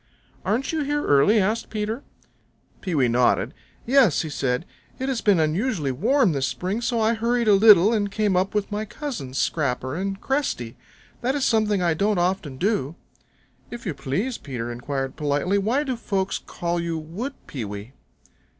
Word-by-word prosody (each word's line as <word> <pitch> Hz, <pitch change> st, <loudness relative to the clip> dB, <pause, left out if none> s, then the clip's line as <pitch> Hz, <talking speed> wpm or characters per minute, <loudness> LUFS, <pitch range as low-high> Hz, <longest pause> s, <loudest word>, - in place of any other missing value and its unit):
"Aren't 225 Hz, +8 st, 0 dB
you 320 Hz, -1 st, -1 dB
here 290 Hz, +1 st, -1 dB
early?" 145 Hz, +11 st, +5 dB
asked 215 Hz, +4 st, 0 dB
Peter. 220 Hz, +3 st, -3 dB, 0.8 s
Pewee 155 Hz, -9 st, +1 dB
nodded. 120 Hz, -1 st, +2 dB, 0.3 s
"Yes," 250 Hz, -, +5 dB, 0.2 s
said 125 Hz, +3 st, -1 dB, 0.3 s
he. -, -, -5 dB
"It 265 Hz, -, -1 dB
has 255 Hz, -4 st, -1 dB
been 200 Hz, -5 st, +4 dB
unusually 160 Hz, -, 0 dB
warm 225 Hz, -, +2 dB
this 135 Hz, -3 st, 0 dB
spring, 190 Hz, -, -3 dB
so 235 Hz, -1 st, 0 dB
I 220 Hz, +1 st, +3 dB
hurried 235 Hz, +1 st, 0 dB
a 210 Hz, -, +7 dB
little 205 Hz, 0 st, +7 dB
and 205 Hz, -2 st, 0 dB
came 210 Hz, -2 st, +1 dB
up 190 Hz, +3 st, 0 dB
with 210 Hz, 0 st, -1 dB
my 210 Hz, +1 st, -2 dB
cousins, 215 Hz, -, -6 dB
Scrapper 130 Hz, -4 st, -1 dB
and 195 Hz, +2 st, -3 dB
Cresty. 255 Hz, -, -2 dB, 0.5 s
That 260 Hz, +3 st, 0 dB
is 280 Hz, -, 0 dB
something 210 Hz, -4 st, +2 dB
I 170 Hz, -2 st, +3 dB
don't 200 Hz, +5 st, +1 dB
often 175 Hz, -6 st, -1 dB
do." 175 Hz, -5 st, 0 dB, 0.7 s
"If 240 Hz, 0 st, -8 dB
you 185 Hz, -, -1 dB
please," 155 Hz, -, -2 dB
Peter 120 Hz, -4 st, -5 dB
inquired 135 Hz, +2 st, -4 dB
politely, 150 Hz, +6 st, +1 dB
"why 235 Hz, +9 st, +1 dB
do 260 Hz, -3 st, -2 dB
folks 195 Hz, -4 st, -2 dB
call 175 Hz, 0 st, -3 dB
you 170 Hz, -1 st, -2 dB
Wood 190 Hz, -, -5 dB
Pewee?" 105 Hz, -2 st, -6 dB
195 Hz, 170 wpm, -24 LUFS, 145-230 Hz, 0.8 s, a